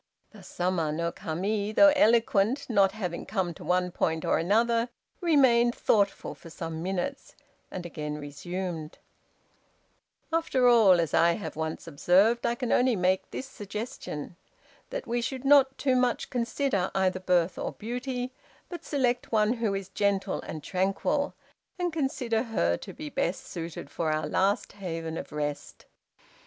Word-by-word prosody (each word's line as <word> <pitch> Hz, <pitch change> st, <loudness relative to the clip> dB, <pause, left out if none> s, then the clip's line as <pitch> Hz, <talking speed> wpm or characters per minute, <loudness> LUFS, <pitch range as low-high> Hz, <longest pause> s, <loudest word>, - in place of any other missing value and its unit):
Thus 205 Hz, -4 st, -14 dB
Sama 175 Hz, -3 st, -1 dB
no 170 Hz, +2 st, -1 dB
Kami, 200 Hz, +7 st, -2 dB
though 295 Hz, +6 st, +7 dB
eloquent, 230 Hz, 0 st, +3 dB
not 200 Hz, -4 st, +3 dB
having 180 Hz, -6 st, -4 dB
come 185 Hz, -4 st, -1 dB
to -, -, -12 dB
one 180 Hz, +1 st, +1 dB
point 160 Hz, -2 st, -1 dB
or -, -, +2 dB
another, 230 Hz, +6 st, +2 dB, 0.3 s
remained 260 Hz, -8 st, +4 dB
thoughtful 200 Hz, -2 st, +1 dB
for 165 Hz, -, -13 dB
some 165 Hz, -1 st, -5 dB
minutes, 190 Hz, +10 st, -3 dB, 0.3 s
and 180 Hz, -2 st, -6 dB
again 150 Hz, -3 st, -5 dB
resumed: 160 Hz, +2 st, -5 dB, 1.4 s
"After 270 Hz, -6 st, +2 dB
all, 215 Hz, -7 st, +6 dB
as 165 Hz, -3 st, -1 dB
I 170 Hz, 0 st, +5 dB
have 200 Hz, -, -6 dB
once 160 Hz, 0 st, -4 dB
observed, 185 Hz, +9 st, +3 dB
I 235 Hz, -, 0 dB
can 245 Hz, 0 st, -3 dB
only 250 Hz, -1 st, +3 dB
make 185 Hz, 0 st, +1 dB
this 260 Hz, -, -5 dB
suggestion: 205 Hz, -, -6 dB, 0.5 s
That -, -, -4 dB
we 240 Hz, 0 st, -1 dB
should 260 Hz, +2 st, -4 dB
not 275 Hz, -1 st, +5 dB
too 265 Hz, -2 st, +1 dB
much 250 Hz, -1 st, 0 dB
consider 235 Hz, -5 st, 0 dB
either 185 Hz, -1 st, +1 dB
birth 180 Hz, -1 st, +1 dB
or -, -, -3 dB
beauty, 250 Hz, +2 st, -4 dB, 0.4 s
but 345 Hz, -2 st, -7 dB
select 250 Hz, -5 st, 0 dB
one 215 Hz, 0 st, +3 dB
who 225 Hz, -5 st, -1 dB
is 195 Hz, -1 st, -5 dB
gentle 200 Hz, -1 st, 0 dB
and 155 Hz, -2 st, -7 dB
tranquil, 195 Hz, -, 0 dB, 0.4 s
and 355 Hz, -2 st, -1 dB
consider 265 Hz, -7 st, 0 dB
her 220 Hz, -, 0 dB
to -, -, -9 dB
be 150 Hz, -, -8 dB
best 175 Hz, +3 st, -1 dB
suited 165 Hz, -4 st, -7 dB
for 165 Hz, -2 st, -1 dB
our 155 Hz, 0 st, 0 dB
last 195 Hz, +5 st, +1 dB
haven 165 Hz, -5 st, -5 dB
of -, -, -6 dB
rest. 145 Hz, -1 st, -4 dB
200 Hz, 150 wpm, -28 LUFS, 170-245 Hz, 1.4 s, though